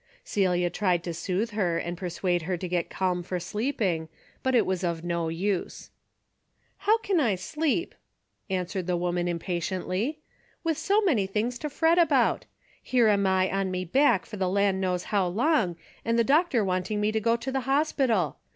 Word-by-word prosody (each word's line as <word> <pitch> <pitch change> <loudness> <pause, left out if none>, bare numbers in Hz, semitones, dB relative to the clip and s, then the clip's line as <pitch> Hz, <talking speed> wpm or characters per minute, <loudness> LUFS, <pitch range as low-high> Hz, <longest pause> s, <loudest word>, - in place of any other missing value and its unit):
Celia 180 -3 +1
tried 180 -2 +1
to 170 - -4
soothe 190 +7 -2
her 185 -6 0
and 175 +1 -3
persuade 175 0 -1
her 180 +2 -2
to 185 - -5
get 175 -1 -1
calm 180 -2 -1
for 180 +1 -3
sleeping, 190 - -2 0.3
but 260 -1 +1
it 240 - +4
was 185 0 -1
of 170 -2 -2
no 170 -1 -1
use. 185 +3 -3 0.9
"How 435 +2 +3
can 395 -5 0
I 230 -9 +2
sleep," 305 - -1 0.6
answered 185 -1 -2
the 180 -1 +1
woman 175 0 -1
impatiently, 185 - -2 0.2
" - - -36
with 325 -3 0
so 405 +2 +2
many 260 - +2
things 225 +5 -2
to 300 - -3
fret 325 +4 +3
about? 290 -7 +3 0.4
Here 240 -4 +3
am 200 -2 +3
I 190 0 +2
on 195 0 0
me 185 0 -3
back 200 - +3
for 210 - -8
the 190 -1 0
land 195 0 +1
knows 180 -1 0
how 195 -3 +3
long, 210 - +1 0.3
and 230 0 +1
the 235 - +4
doctor 275 - +3
wanting 185 +3 -1
me 210 +1 +1
to 220 - 0
go 230 +2 +3
to 240 +3 -4
the 265 - 0
hospital. 270 - +1
195 Hz, 185 wpm, -27 LUFS, 180-245 Hz, 0.9 s, it